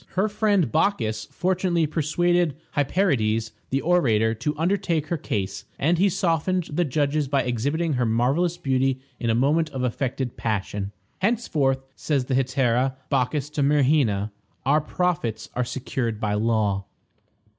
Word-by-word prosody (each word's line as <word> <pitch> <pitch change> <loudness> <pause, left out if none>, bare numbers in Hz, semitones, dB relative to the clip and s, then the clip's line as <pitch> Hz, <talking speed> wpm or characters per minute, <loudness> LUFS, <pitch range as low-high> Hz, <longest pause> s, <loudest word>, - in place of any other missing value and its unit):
Her 195 +3 +2
friend 205 - +1
Bacchis 130 - +1
fortunately 180 -2 +1
persuaded 170 +1 +1 0.2
Hyperides, 125 - +1 0.2
the 135 +1 0
orator, 115 -11 +3
to 150 +7 -3
undertake 170 -2 0
her 170 - 0
case, 100 -9 -3
and 165 +4 +2
he 200 +2 +4
softened 180 0 +1
the 175 +3 +1
judges 145 +1 0
by 135 -1 +1
exhibiting 140 +7 -1
her 125 -2 +1
marvelous 135 +10 +1
beauty 130 -1 +1 0.2
in 115 - -1
a 115 - +3
moment 150 +6 +2
of 130 -3 -4
affected 125 0 -2
passion. 100 -2 -2 0.3
"Henceforth," 155 - +1
says 140 -4 -1
the 130 - -2
hetaira 130 0 +1 0.2
Bacchis 140 +3 0
to 150 - -2
Myrrhina, 135 -8 +2 0.3
"our 145 +3 +4
profits 155 - -2
are 125 - 0
secured 125 -2 -3
by 105 -1 -1
law." 105 -2 +1
140 Hz, 140 wpm, -24 LUFS, 120-170 Hz, 0.3 s, he